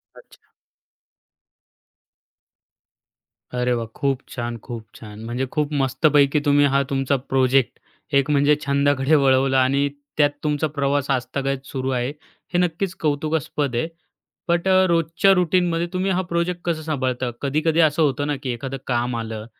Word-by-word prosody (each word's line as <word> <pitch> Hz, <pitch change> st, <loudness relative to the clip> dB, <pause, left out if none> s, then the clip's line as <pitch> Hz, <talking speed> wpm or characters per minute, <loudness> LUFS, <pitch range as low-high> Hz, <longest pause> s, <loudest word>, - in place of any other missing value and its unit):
अच्छा. -, -, -20 dB, 3.0 s
अरे, 125 Hz, 0 st, 0 dB
वाह! 115 Hz, -1 st, -2 dB
खूप 140 Hz, -3 st, 0 dB
छान, 120 Hz, -1 st, -4 dB
खूप 115 Hz, 0 st, -8 dB
छान. 105 Hz, -1 st, -10 dB
म्हणजे 120 Hz, +3 st, -2 dB
खूप 150 Hz, 0 st, 0 dB
मस्तपैकी 140 Hz, +2 st, +3 dB
तुम्ही 145 Hz, 0 st, +4 dB
हा, 140 Hz, 0 st, +2 dB
तुमचा 135 Hz, 0 st, +1 dB
प्रोजेक्ट, 130 Hz, 0 st, +1 dB, 0.4 s
एक 140 Hz, +1 st, +3 dB
म्हणजे 145 Hz, +1 st, +4 dB
छंदाकडे 140 Hz, +1 st, +2 dB
वळवला 135 Hz, -1 st, +3 dB
आणि 140 Hz, +2 st, +1 dB, 0.3 s
त्यात 145 Hz, -1 st, +5 dB
तुमचा 150 Hz, 0 st, 0 dB
प्रवास 140 Hz, -1 st, -1 dB
आजतागायत 135 Hz, +1 st, -2 dB
सुरू 130 Hz, -1 st, -4 dB
आहे, 125 Hz, -1 st, -1 dB, 0.4 s
हे -, -, +2 dB
नक्कीच 180 Hz, +1 st, -1 dB
कौतुकास्पद 150 Hz, -3 st, -1 dB
आहे. 120 Hz, +7 st, 0 dB, 0.6 s
बट 170 Hz, +2 st, +1 dB
अ, 190 Hz, 0 st, +5 dB
रोजच्या 170 Hz, +3 st, +3 dB
रूटीनमध्ये 175 Hz, -1 st, +1 dB
तुम्ही 185 Hz, +1 st, 0 dB
हा 185 Hz, 0 st, +1 dB
प्रोजेक्ट 170 Hz, +1 st, -1 dB
कसं 165 Hz, -2 st, -1 dB
सांभाळता? 130 Hz, -5 st, -2 dB
कधी-कधी 155 Hz, +4 st, +1 dB
असं 155 Hz, -1 st, +3 dB
होतं 145 Hz, -1 st, +1 dB
ना, 145 Hz, -, 0 dB
की 130 Hz, -, -3 dB
एखादं 135 Hz, +3 st, -5 dB
काम 120 Hz, -1 st, 0 dB
आलं 110 Hz, -1 st, -5 dB
140 Hz, 140 wpm, -22 LUFS, 130-155 Hz, 3.0 s, त्यात